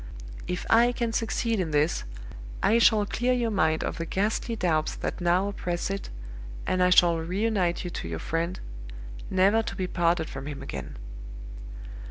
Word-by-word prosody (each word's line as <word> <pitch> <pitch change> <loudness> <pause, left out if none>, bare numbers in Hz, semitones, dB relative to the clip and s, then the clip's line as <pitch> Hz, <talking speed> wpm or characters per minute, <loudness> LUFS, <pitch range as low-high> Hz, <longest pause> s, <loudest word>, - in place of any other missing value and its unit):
If 180 0 -3
I 235 +2 +5
can 235 -2 -2
succeed 225 0 0
in 175 -3 -1
this, 150 +2 +1 0.6
I 225 +3 +4
shall 215 -2 +5
clear 245 +5 0
your 240 -2 0
mind 160 -5 +1
of - - -4
the 165 - -3
ghastly 215 +5 -1
doubts 160 -7 0
that - - -4
now 175 +3 +2
oppress 175 -2 -3
it, 195 - -4 0.6
and 185 - 0
I 180 - +5
shall 175 -2 +5
reunite 185 +1 0
you 175 - -5
to - - -5
your 80 -1 -4
friend, 165 - -2 0.7
never 195 +4 +4
to 205 - -5
be 190 -2 -2
parted 170 -2 +1
from 135 +1 -7
him 145 -2 -6
again. 65 -3 -7
185 Hz, 170 wpm, -27 LUFS, 165-215 Hz, 0.7 s, I